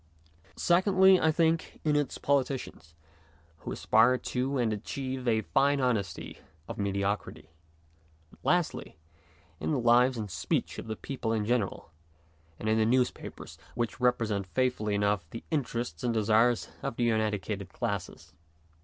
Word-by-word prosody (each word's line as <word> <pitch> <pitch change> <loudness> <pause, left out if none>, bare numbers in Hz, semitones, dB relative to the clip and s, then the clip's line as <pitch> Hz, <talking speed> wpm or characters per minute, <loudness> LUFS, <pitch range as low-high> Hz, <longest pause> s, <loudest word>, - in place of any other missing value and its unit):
Secondly, 190 +1 +5
I 160 - +4
think, 165 0 0
in 150 -1 +2
its 145 -2 0
politicians, 130 - -2 0.6
who - - -6
aspire 120 +4 +4
to 130 +3 -2
and 115 -3 +1
achieve 130 +4 -4
a 110 -2 +3
fine 140 +4 +2
honesty 120 -7 -2 0.3
of - - -7
mediocrity; 100 -5 -2 0.8
and, - - -20
lastly, 175 - 0 0.6
in - - -2
the 150 - +1
lives 120 +2 +4
and 105 -3 -5
speech - - -2
of - - -8
the 110 - -3
people 125 -1 -4
in 110 -2 0
general, 110 -7 -1 0.7
and 110 - -5
in 110 0 +3
the 110 - +3
newspapers, 125 +1 -1 0.2
which 120 0 -2
represent 115 -6 +1
faithfully 110 -1 0
enough 100 -4 0
the 115 - -8
interests 120 - -2
and 120 -2 0
desires 110 +2 +3
of 135 -3 -3
the 120 -1 +2
uneducated 105 -2 -2
classes. 100 -8 -4
120 Hz, 140 wpm, -29 LUFS, 105-130 Hz, 0.8 s, Secondly